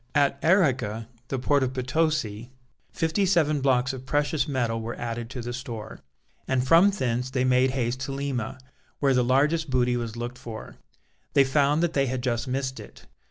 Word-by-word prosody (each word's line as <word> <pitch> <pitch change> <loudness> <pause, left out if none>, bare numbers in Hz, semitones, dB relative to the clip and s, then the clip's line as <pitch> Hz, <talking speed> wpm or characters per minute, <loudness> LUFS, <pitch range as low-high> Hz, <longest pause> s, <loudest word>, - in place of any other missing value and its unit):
At 140 -1 +3
Arica, 130 - +2 0.2
the 135 - -2
port 140 +3 +2
of 130 0 -1
Potosi, 130 -4 -1 0.4
fifty 165 +5 0
seven 155 -6 +2
blocks 130 -1 +2
of 130 0 -8
precious 145 0 +1
metal 120 -5 -1
were 115 +1 -5
added 115 -1 -4
to 125 -2 -6
the 120 +1 -4
store; 115 -4 -7 0.5
and 130 -1 +1
from 170 +6 +7
thence 125 - -1
they 130 -1 0
made 130 0 +3
haste 130 -1 -1
to 130 +1 -4
Lima, 135 -3 -3 0.4
where 140 -2 +2
the 125 -1 +3
largest 145 +5 +2
booty 125 -1 +2
was 120 -1 -4
looked 120 +1 -5
for. 110 -2 -9 0.6
They 140 - +6
found 145 +3 +2
that 170 -1 0
they 135 -1 +2
had 125 0 -3
just 120 -1 -1
missed 130 0 -2
it. - - -13
130 Hz, 180 wpm, -26 LUFS, 120-145 Hz, 0.6 s, from